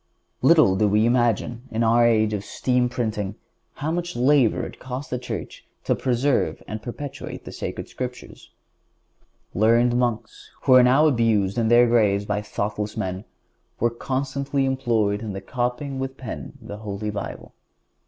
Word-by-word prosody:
(151) - - +3
Little 95 0 +6
do - - 0
we 105 +2 +4
imagine, 120 -1 +1
in 115 +1 -1
our 115 +1 +4
age 110 -2 +2
of 100 -2 -2
steam 125 +2 0
printing, 110 -5 -3 0.4
how 150 +2 -3
much 175 +1 -3
labor 130 -1 +3
it - - -10
cost 130 +1 -6
the 125 - -1
Church 125 - -6 0.2
to - - +1
preserve 130 +2 0
and 110 0 -5
perpetuate 130 +4 -7
the - - -7
Sacred - - -5
Scriptures. 125 -1 -7 1.0
Learned 115 +4 +3
monks, 120 -2 -2
who 130 - +5
are 130 - +9
now 130 +5 +5
abused 115 -7 +2
in 115 - +1
their 120 +1 +6
graves 105 -4 +2
by 105 0 -1
thoughtless 105 0 -3
men, 95 +2 -3 0.5
were 120 +1 +2
constantly 135 +3 -2
employed 115 -6 0
in 105 -4 -5
copying 125 +5 -3
with 135 0 -4
the - - -16
pen 115 - -6
the 105 - -8
Holy 105 0 -4
Bible. 100 -1 -7
120 Hz, 160 wpm, -23 LUFS, 105-130 Hz, 1.0 s, are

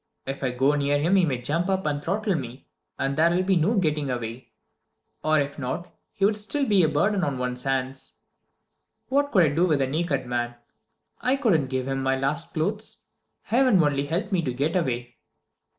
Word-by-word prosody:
If 135 +1 -5
I 130 - +1
go 130 +3 +2
near 145 0 +1
him 165 +7 +2
he 185 -2 +5
may 135 -6 -1
jump 170 +7 0
up 190 0 0
and 145 -1 -1
throttle 200 +4 0
me, 130 -4 -5 0.3
and 135 0 -1
there 160 +3 +4
will 175 +2 +1
be 190 0 +2
no 175 +7 +2
getting 150 -6 0
away. 120 0 -5 0.7
Or 155 0 +3
if 140 0 -3
not, 140 +7 -4 0.2
he'd 205 +2 +2
still 265 +7 -1
be 200 -3 +4
a 160 - +3
burden 190 +6 +1
on 140 -4 -1
one's 125 0 -3
hands. 135 0 -2 0.9
What 285 +2 +1
could 185 -5 +5
I 155 - +4
do 170 +4 +3
with 150 -4 +2
a 135 - +2
naked 145 -1 -1
man? 120 -1 -2 0.7
I 255 +2 +2
couldn't 195 - +2
give 130 0 -2
him 135 0 -1
my 135 0 +1
last 140 +5 -1
clothes. 205 +7 -2 0.4
Heaven 240 -7 +3
only 145 -1 0
help 170 +8 -2
me 185 -3 +2
to 140 -6 -2
get 145 +6 0
away!" 125 -8 -2
150 Hz, 200 wpm, -25 LUFS, 135-185 Hz, 0.9 s, he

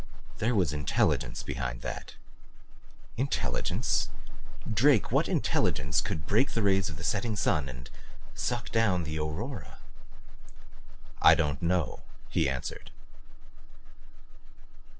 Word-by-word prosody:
There 115 +2 +1
was 90 -7 +2
intelligence 75 -3 0
behind - - -4
that." - - -6 1.0
"Intelligence? 135 +3 0 0.6
Drake 115 +2 +4
what - - +2
intelligence 65 +1 +1
could 75 - -4
break 110 - +2
the 115 - 0
rays 95 -2 +3
of 75 - -7
the 85 - -8
setting 105 +7 0
sun 75 -8 +1
and 65 -1 -8 0.5
suck 120 -1 -2
down 105 -6 +2
the 80 0 -3
aurora?" 95 - -4 1.4
"I - - +8
don't 75 -1 0
know," 85 -4 0 0.3
he - - +2
answered. 65 -2 -5
90 Hz, 110 wpm, -29 LUFS, 75-110 Hz, 1.4 s, I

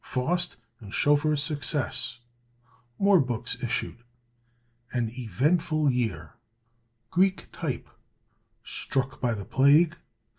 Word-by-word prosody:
Faust 175 +8 0 0.2
and 100 -3 -11
Schoeffer's 145 +3 +2
Success. 145 -5 -1 0.8
More 200 -2 +5
Books 125 -5 -2
issued. 120 0 -2 0.9
An 120 -3 -1
Eventful 150 - +1
Year. 95 - -2 0.8
Greek 190 +1 +2
Type. - - -4 0.8
Struck 135 -1 -2
by 120 -3 +1
the 100 -2 -6
Plague. 150 +5 +4
135 Hz, 90 wpm, -27 LUFS, 120-155 Hz, 0.9 s, More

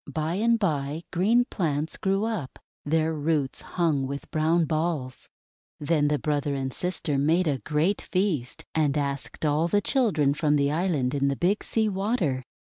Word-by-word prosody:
By 160 +1 -1
and 230 +5 +2
by, 155 -5 -1
green 225 +8 +3
plants 155 - -2
grew 195 +1 0
up, 210 - -4 0.3
their 160 +1 +1
roots 150 -3 -1
hung 155 -6 0
with 140 +1 -6
brown 160 +1 +2
balls. 155 -5 -2 0.5
Then 150 0 +2
the 150 0 +2
brother 145 -1 -1
and 135 -1 -3
sister 170 -5 -1
made 165 +5 +2
a 140 -3 0
great 155 +9 0
feast, 180 -10 -2
and 150 -3 +1
asked 140 +1 -3
all 150 +3 +2
the 205 +4 +2
children 195 - +2
from 150 0 +1
the 140 0 +2
island 155 -6 0
in 140 -1 +1
the 140 - +1
Big 185 +8 +1
Sea 220 -1 0
Water. 190 - 0
155 Hz, 165 wpm, -26 LUFS, 145-180 Hz, 0.5 s, green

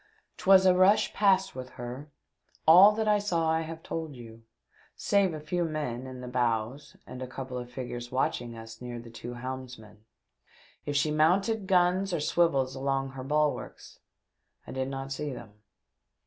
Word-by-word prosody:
'Twas 190 0 +5
a 185 - +6
rush 185 +3 +4
past 195 -2 +3
with 130 0 -7
her; 125 +5 -7 0.6
all 185 +6 +9
that 220 +1 -2
I 210 -1 +4
saw 170 -6 0
I 160 0 +1
have 165 0 -7
told 160 -3 -5
you, 115 -2 -12 0.5
saving 195 -4 +1
a - - -6
few 175 +4 -2
men 145 -6 -3
in 130 -1 -8
the 125 - -7
bows 120 +2 -2
and 125 - -9
a 130 - -4
couple 130 0 -7
of 125 -1 -5
figures 120 -1 -6
watching 120 -2 -1
us 115 0 -11
near 120 -1 -6
to 120 - -9
the 115 - -12
two 120 +1 -8
helmsmen. 125 -4 -8 0.8
If 145 - -2
she 145 +2 +2
mounted 190 +7 +2
guns 185 0 +2
or - - -1
swivels 145 -4 +1
along 135 0 -1
her 135 -1 -8
bulwarks 150 +2 -2 0.7
I - - -9
did 130 0 -2
not 135 0 -5
see 145 +1 -3
them. 115 -3 -10
135 Hz, 175 wpm, -28 LUFS, 125-170 Hz, 0.8 s, all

